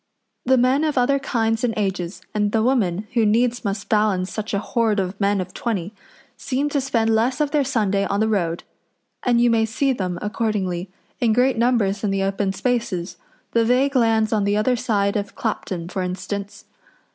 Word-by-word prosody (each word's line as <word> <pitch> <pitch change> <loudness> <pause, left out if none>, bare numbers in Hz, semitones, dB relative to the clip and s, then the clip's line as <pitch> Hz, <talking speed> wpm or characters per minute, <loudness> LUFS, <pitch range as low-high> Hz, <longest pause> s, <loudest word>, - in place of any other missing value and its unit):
The 260 0 +5
men 255 +4 +3
of 305 -3 0
other 275 +3 +3
kinds 225 -4 0
and 230 -3 0
ages, 190 -3 -2
and 210 -1 0
the 220 0 +2
women, 215 -6 +1
who 235 -2 +3
needs 235 +3 +2
must 200 -1 -3
balance 210 -4 +1
such 215 0 -4
a 200 - 0
horde 220 0 0
of 190 +2 -3
men 200 0 +2
of 185 0 -5
twenty, 205 -4 -3 0.4
seem 275 +3 -2
to 285 -1 0
spend 230 -4 +1
less 245 +5 +1
of 295 -1 +1
their 295 -2 +2
Sunday 205 -6 0
on 200 - -1
the 220 - +2
road, 175 -6 -1 0.6
and 240 -2 +2
you 240 0 +4
may 225 -1 +3
see 265 +5 0
them, 185 -6 -3
accordingly, 205 -5 -2 0.3
in 235 -4 +2
great 255 +3 +3
numbers 225 -4 +1
in 210 - +1
the 195 0 0
open 195 0 0
spaces 195 -5 -2 0.3
the 230 - +3
vague 260 +4 +2
lands 225 -3 +3
on 210 -2 +2
the 205 +1 +1
other 250 +4 +2
side 205 -5 0
of 205 -1 -3
Clapton, 185 -6 -3
for 190 +1 -3
instance. 195 +2 -5
220 Hz, 190 wpm, -22 LUFS, 200-245 Hz, 0.6 s, The